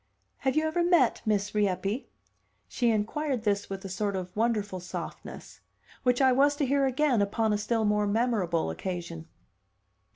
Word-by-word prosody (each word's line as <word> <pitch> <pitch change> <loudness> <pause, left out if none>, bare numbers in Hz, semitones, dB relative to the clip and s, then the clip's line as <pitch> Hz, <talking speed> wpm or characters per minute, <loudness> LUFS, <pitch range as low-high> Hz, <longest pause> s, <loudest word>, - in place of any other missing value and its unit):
"Have 265 -1 -1
you 310 0 +2
ever 345 +2 +1
met 345 -9 +3
Miss 205 -1 0
Rieppe?" 205 +3 -1 0.6
She 240 -2 0
inquired 230 +4 -1
this 205 -2 0
with 195 0 -6
a - - -3
sort 200 +1 -2
of 185 -1 -5
wonderful 210 -4 0
softness 180 0 -8 0.4
which 250 +1 +2
I 260 - +6
was 285 +3 +4
to 285 - 0
hear 275 +1 +2
again 260 -3 +2
upon 210 +2 +1
a - - +1
still 220 +1 0
more 210 0 +2
memorable 200 - 0
occasion. 170 - -5
215 Hz, 160 wpm, -28 LUFS, 200-260 Hz, 0.6 s, I